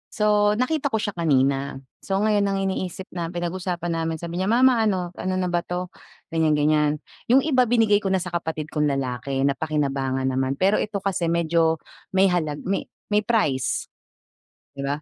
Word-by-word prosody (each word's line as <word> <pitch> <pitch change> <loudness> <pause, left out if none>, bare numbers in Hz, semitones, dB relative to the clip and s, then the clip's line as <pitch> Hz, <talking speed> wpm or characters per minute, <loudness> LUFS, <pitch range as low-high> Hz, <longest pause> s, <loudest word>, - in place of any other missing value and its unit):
So, 210 -1 +3
nakita 280 +5 0
ko 220 - +1
siya 205 - -1
kanina. 140 -5 +1 0.2
So, 195 - -4
ngayon 210 -2 +2
ang 195 0 0
iniisip 190 -1 -3
nam 170 -1 -5
pinag-usapan 175 0 -3
namin 165 0 -1
sabi 170 +2 -5
niya, 190 - 0
"Mama 245 +2 +4
ano, 180 -4 0
ano 185 0 -2
na 180 -1 -1
ba 175 - +2
'to?" 180 +1 -4 0.4
ganyan-ganyan. 150 -2 +2 0.2
Yung 260 +3 +5
iba 255 -5 +3
binigay 220 -3 +4
ko 195 -2 -1
na 185 - +1
sa 180 - -5
kapatid 160 -3 -3
kong 150 -1 0
lalaki 135 0 -2
napakinabangan 135 -2 0
naman. 130 +1 0
Pero 195 +7 +2
ito 200 -2 -3
kasi 180 -4 -1
medyo 165 -1 +1 0.3
may 190 0 +5
halag 155 -4 -1
may 195 +1 -2 0.2
may 210 0 +2
price, 145 - 0 0.9
'di 140 - -3
ba? 145 +2 -2
175 Hz, 170 wpm, -24 LUFS, 150-200 Hz, 0.9 s, Yung